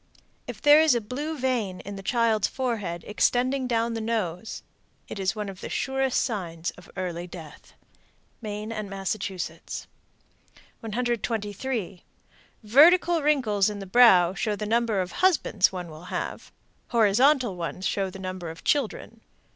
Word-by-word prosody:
If -, -, -8 dB
there 295 Hz, +1 st, +8 dB
is 315 Hz, -5 st, +4 dB
a -, -, +2 dB
blue 285 Hz, +8 st, -5 dB
vein 240 Hz, -8 st, -1 dB
in 200 Hz, +1 st, -8 dB
the 195 Hz, -, -7 dB
child's 220 Hz, -1 st, +2 dB
forehead 210 Hz, -10 st, -3 dB
extending 255 Hz, +5 st, +1 dB
down 230 Hz, -1 st, 0 dB
upon -, -, -3 dB
the 225 Hz, -, -3 dB
nose, 220 Hz, -4 st, -3 dB, 0.4 s
it -, -, -7 dB
is 190 Hz, +3 st, 0 dB
one 210 Hz, -1 st, -4 dB
of 195 Hz, -1 st, -9 dB
the -, -, -6 dB
surest 265 Hz, -1 st, 0 dB
signs 175 Hz, -8 st, -3 dB
of 180 Hz, -, -16 dB
early 175 Hz, -1 st, -4 dB
death. 165 Hz, -4 st, -12 dB, 0.7 s
Maine 210 Hz, 0 st, -5 dB
and 215 Hz, -2 st, -5 dB
Massachusetts. 190 Hz, -4 st, -4 dB, 0.9 s
123. 225 Hz, -3 st, -3 dB, 0.6 s
Vertical 330 Hz, +9 st, +5 dB
wrinkles 240 Hz, -10 st, +2 dB
in 210 Hz, -, -5 dB
the 195 Hz, -, -7 dB
brow 190 Hz, -4 st, +6 dB
show 210 Hz, +2 st, -1 dB
the 210 Hz, -, -4 dB
number 225 Hz, -2 st, +1 dB
of 180 Hz, -, -4 dB
husbands 335 Hz, -, +2 dB
one 180 Hz, -3 st, -6 dB
will 155 Hz, +3 st, -11 dB
have. -, -, -5 dB, 0.4 s
Horizontal 240 Hz, +1 st, +3 dB
ones 175 Hz, +2 st, -5 dB
show 195 Hz, -1 st, 0 dB
the 190 Hz, -, -10 dB
number 185 Hz, -2 st, -5 dB
of 165 Hz, 0 st, -10 dB
children. 230 Hz, -4 st, -1 dB
215 Hz, 150 wpm, -26 LUFS, 185-245 Hz, 0.9 s, there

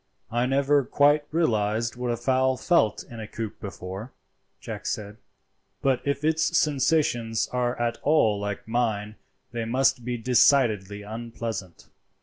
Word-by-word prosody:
"I 120 Hz, +2 st, +1 dB
never 140 Hz, +1 st, +3 dB
quite 145 Hz, +3 st, +3 dB
realized 115 Hz, -7 st, 0 dB
what 125 Hz, 0 st, -3 dB
a 120 Hz, -, 0 dB
fowl 130 Hz, +1 st, +1 dB
felt 115 Hz, -, +2 dB
in 115 Hz, -, -11 dB
a 110 Hz, -, -6 dB
coop 110 Hz, 0 st, -6 dB
before," 95 Hz, +4 st, -7 dB, 0.5 s
Jack -, -, -7 dB
said, 105 Hz, 0 st, -4 dB, 0.7 s
"but 135 Hz, -2 st, +2 dB
if 140 Hz, 0 st, -1 dB
its 160 Hz, +1 st, +2 dB
sensations 130 Hz, -6 st, +1 dB
are 125 Hz, -1 st, -1 dB
at 120 Hz, -1 st, -1 dB
all 115 Hz, -9 st, +3 dB
like 105 Hz, +1 st, -4 dB
mine 110 Hz, -3 st, -1 dB, 0.3 s
they 120 Hz, -2 st, -3 dB
must 125 Hz, +2 st, +1 dB
be 120 Hz, 0 st, -2 dB
decidedly 110 Hz, -5 st, +3 dB
unpleasant. 110 Hz, -4 st, -6 dB
120 Hz, 135 wpm, -26 LUFS, 110-135 Hz, 0.7 s, never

